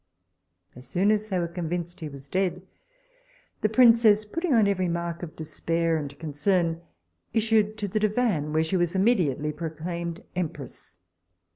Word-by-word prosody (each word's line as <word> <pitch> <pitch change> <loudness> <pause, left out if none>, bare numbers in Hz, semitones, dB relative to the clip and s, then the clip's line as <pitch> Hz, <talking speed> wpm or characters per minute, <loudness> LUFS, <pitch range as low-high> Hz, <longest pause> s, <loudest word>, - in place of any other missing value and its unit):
As 125 +1 -12
soon 190 +9 +2
as 215 0 0
they 190 - 0
were 170 -1 0
convinced 175 0 -4
he 155 - -5
was 140 -1 -11
dead, 185 +3 -1 1.0
the 215 - +2
princess, 225 -2 +5
putting 330 +10 -2
on 225 -5 +5
every 185 -2 +1
mark 170 0 -3
of 170 -3 -7
despair 165 +1 -1
and 145 -2 -4
concern, 165 +2 0 0.5
issued 220 -1 +2
to 205 -2 -2
the 205 +3 -1
divan, 210 -8 +1
where 160 +1 +2
she 160 +4 0
was 175 0 0
immediately 175 - +2
proclaimed 170 +2 -5
empress. 150 -7 -6
175 Hz, 150 wpm, -26 LUFS, 160-210 Hz, 1.0 s, princess